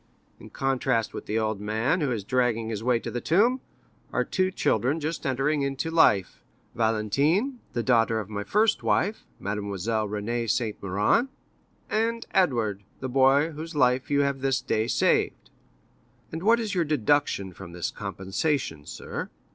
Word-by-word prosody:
In - - -12
contrast 130 -4 0
with - - -7
the 110 - -1
old 110 -2 -1
man, 110 - 0
who 140 -4 0
is 110 -5 -2
dragging 115 -1 0
his 110 -1 -4
way 125 0 +3
to - - -6
the 120 - -3
tomb, 235 +10 +3 0.5
are - - +1
two 185 -1 0
children 150 -5 +1
just 155 0 -3
entering 135 +3 +1
into 140 +4 -2
life—Valentine, 140 - +1
the 120 - -1
daughter 115 -3 +2
by 105 +2 -12
my 105 0 -2
first 210 - +2
wife—Mademoiselle 105 - -2
Renée 115 +3 -2
de - - -8
Saint 110 -1 -1
Méran—and 225 - -1
Edward, 115 - +1 0.2
the 130 - -4
boy 135 +4 +4
whose 160 +2 -7
life 125 -2 +2
you 145 0 +3
have 140 -1 -1
this 135 0 +1
day 110 +1 -1
saved." - - +1 0.8
"And 160 - -5
what 225 +5 +4
is 220 -3 -3
your 180 -3 +2
deduction 145 - +1
from 90 -1 -10
this 90 0 -3
compensation, 95 - -2
sir?" - - -6
125 Hz, 155 wpm, -26 LUFS, 110-155 Hz, 0.8 s, boy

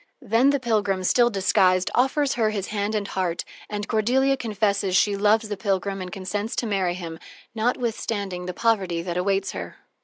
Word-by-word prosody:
Then 235 +3 +3
the 280 0 +2
pilgrim, 205 -6 0
still 240 +6 +4
disguised, 185 -2 +2
offers 270 +3 +2
her 225 -3 +1
his 200 -3 -3
hand 210 0 -1
and 205 -2 -1
heart 180 -3 -2 0.2
and 210 0 -4
Cordelia 260 +5 +2
confesses 205 -5 0
she 200 +2 +3
loves 215 +2 +3
the 205 - -3
pilgrim 195 0 -1
and 180 -1 -6
consents 205 +4 -3
to - - -1
marry 190 -5 0
him, 165 -3 -7 0.3
notwithstanding 220 -5 -2
the 180 - -3
poverty 190 -7 +1
that 175 -1 -4
awaits 195 +1 0
her. - - -7
205 Hz, 175 wpm, -24 LUFS, 185-225 Hz, 0.3 s, still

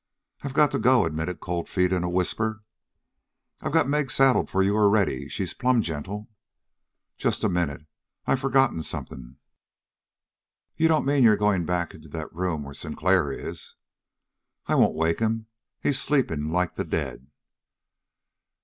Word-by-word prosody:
"I've 140 -1 -6
got 150 -1 +4
to - - -1
go," 130 0 +4
admitted 80 +1 -3
Cold 85 -1 -3
Feet 90 -1 +1
in 90 -1 0
a 90 - -1
whisper. 110 +4 -1 1.0
"I've - - -3
got 160 -2 +3
Meg 145 -1 0
saddled 135 0 +3
for 95 - +2
you 100 +2 +2
already. 100 -9 +2
She's 95 - -3
plumb 125 -2 +2
gentle." 95 +7 -5 0.9
"Just - - 0
a - - +3
minute. 75 -5 -2 0.4
I've 135 - +1
forgotten 135 -9 +2
something." 65 -4 -6 1.4
"You 160 +1 +3
don't 160 -3 +2
mean 140 0 +2
you're 110 -4 +6
going 100 -5 +1
back 90 -1 -1
into 80 0 -14
that 80 +1 -7
room 85 -3 -2
where 70 0 -9
Sinclair 90 -1 0
is?" - - -7 0.9
"I - - -1
won't - - +4
waken 80 +6 0
him. 110 0 -1 0.3
He's 140 - 0
sleeping 80 - 0
like 90 0 0
the - - -3
dead." 65 -4 -4
95 Hz, 150 wpm, -25 LUFS, 80-125 Hz, 1.4 s, you're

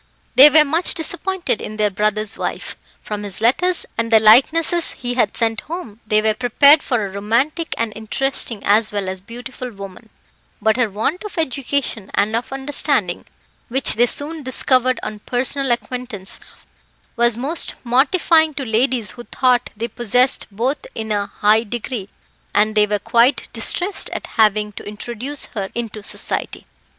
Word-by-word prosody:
They 280 +3 +9
were 305 0 +6
much 325 +5 +3
disappointed 345 - -1
in 215 - -7
their 210 -1 +1
brother's 215 +1 -1
wife; - - -5 0.3
from 210 -1 -5
his 200 -3 -3
letters, 350 +11 +1
and 230 0 -1
the 220 - +7
likenesses 310 +10 +4
he 245 -1 -4
had 230 -5 0
sent 225 -2 0
home, 310 - -8
they 215 0 +2
were 220 0 +2
prepared 270 +6 +5
for 235 -5 -1
a 195 - -7
romantic 235 - -1
and 230 -2 -2
interesting, 230 0 -2
as 215 +2 +3
well 205 -2 -3
as 185 0 -5
beautiful 245 +4 -8
woman, 200 +1 -11 0.5
but 220 0 +2
her 245 -3 +1
want 225 - -2
of 420 -3 -8
education 270 -7 -2
and 215 +2 +1
of 235 +3 -3
understanding, 270 - -1 0.4
which 260 0 +3
they 240 +2 +3
soon 305 +5 -4
discovered 255 -1 +1
on 215 - -5
personal 260 +4 -1
acquaintance, 240 -5 -3 0.8
was 235 -2 +2
most 295 +7 -2
mortifying 315 +5 +3
to 275 - -4
ladies 230 -2 0
who 240 +3 -11
thought 250 -1 +1
they 230 +2 -3
possessed 245 +3 +1
both 240 +8 -2 0.2
in 220 -1 -4
a 205 -1 -1
high 210 +2 +2
degree, 230 -2 -5 0.5
and 215 +1 +3
they 210 -1 +3
were 210 0 0
quite 235 +6 +2
distressed 380 +2 0
at - - -5
having 210 -1 +1
to - - -10
introduce 240 +7 -4
her 195 -4 -4
into 225 -3 -5
society. 205 - -4
235 Hz, 160 wpm, -19 LUFS, 215-270 Hz, 0.8 s, They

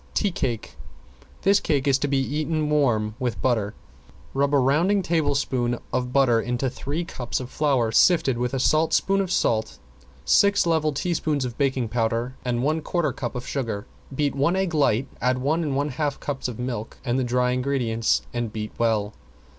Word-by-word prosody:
~TEA 205 - +1
CAKE~ 120 -9 -3 0.7
This 200 +1 +5
cake 145 -3 0
is 135 -1 +3
to 145 - 0
be 140 -1 +1
eaten 150 +3 -1
warm 115 -8 +2
with 120 -6 -2
butter. 110 -5 0 0.6
Rub 140 +1 +2
a - - +6
rounding 165 +10 +2
tablespoon 140 -7 0 0.2
of 125 0 -1
butter 125 -4 +3
into 125 +2 -1
three 150 +6 -4
cups 125 -7 -4
of 125 -1 -7
flour 135 -7 +1
sifted 135 -4 +4
with 125 +2 -1
a - - -1
saltspoon 160 +7 +2
of 185 -2 -3
salt, 110 - 0 0.5
six 200 - +4
level 160 -2 +2
teaspoons 150 -2 -1
of 120 -2 -5
baking 130 -4 0
powder 115 +2 -1
and 120 -1 -1
one 155 +3 +1
quarter 155 -4 -1
cup 125 -1 -5
of 125 0 -5
sugar. 115 -7 -3 0.3
Beat 145 0 0
one 145 +6 +1
egg 190 -2 0
light, 135 -4 +2
add 125 +1 +2
one 145 +6 0
and 145 -4 -1
one 145 +2 0
half 145 +1 -2
cups 140 -3 -3
of 120 -3 -6
milk 120 -3 -4
and 125 +1 +1
the - - +1
dry 125 0 +1
ingredients 125 -3 0
and 120 -2 -2
beat 110 0 -5
well. 110 -3 +1
135 Hz, 180 wpm, -24 LUFS, 120-150 Hz, 0.7 s, a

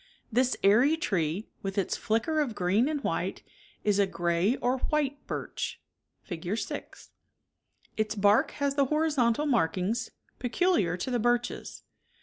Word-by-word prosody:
This 250 +3 +2
airy 245 +11 +5
tree 185 - -1
with 195 +1 -4
its 195 - 0
flicker 230 +9 0
of 265 -8 -1
green 200 +9 +2
and 295 -2 -2
white - - -2 0.4
is 205 -1 +2
a 200 - +4
gray 175 +5 +1
or 250 +1 0
white 285 0 -1
birch - - -4 0.4
(Fig. 175 +3 -4
6). - - -6 0.9
Its 215 0 0
bark 205 +1 +4
has 280 -1 0
53 280 0 +3
the 265 - -2
horizontal 300 -4 +2
markings 205 - 0 0.3
peculiar 255 - +1
to 220 +8 -3
the 245 - +1
birches. 240 +1 -1
230 Hz, 140 wpm, -29 LUFS, 195-280 Hz, 0.9 s, airy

